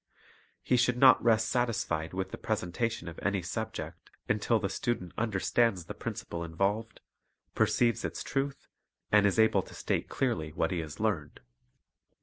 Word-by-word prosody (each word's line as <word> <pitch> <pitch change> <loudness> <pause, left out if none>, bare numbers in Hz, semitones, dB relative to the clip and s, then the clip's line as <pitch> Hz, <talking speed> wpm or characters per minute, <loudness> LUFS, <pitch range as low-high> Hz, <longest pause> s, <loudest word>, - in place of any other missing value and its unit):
He 125 - +2
should 125 0 +2
not 130 0 +7
rest 110 -1 +4
satisfied 105 -11 -1
with 95 0 -3
the - - -5
presentation 100 +2 -2
of 85 - -7
any 100 -2 0
subject 110 +5 -5 0.2
until 110 +2 +2
the 100 - -1
student 95 -3 -2
understands 110 -2 +1
the - - -6
principle 85 0 -5
involved, 100 +7 -2 0.5
perceives 120 -1 +2
its - - -4
truth, 135 0 -3 0.4
and 105 -1 +6
is 100 - 0
able 110 0 +4
to - - -13
state - - -2
clearly 80 - -1
what 80 - 0
he 90 - -1
has 80 -2 -6
learned. 100 -9 -1
105 Hz, 150 wpm, -30 LUFS, 90-120 Hz, 0.5 s, not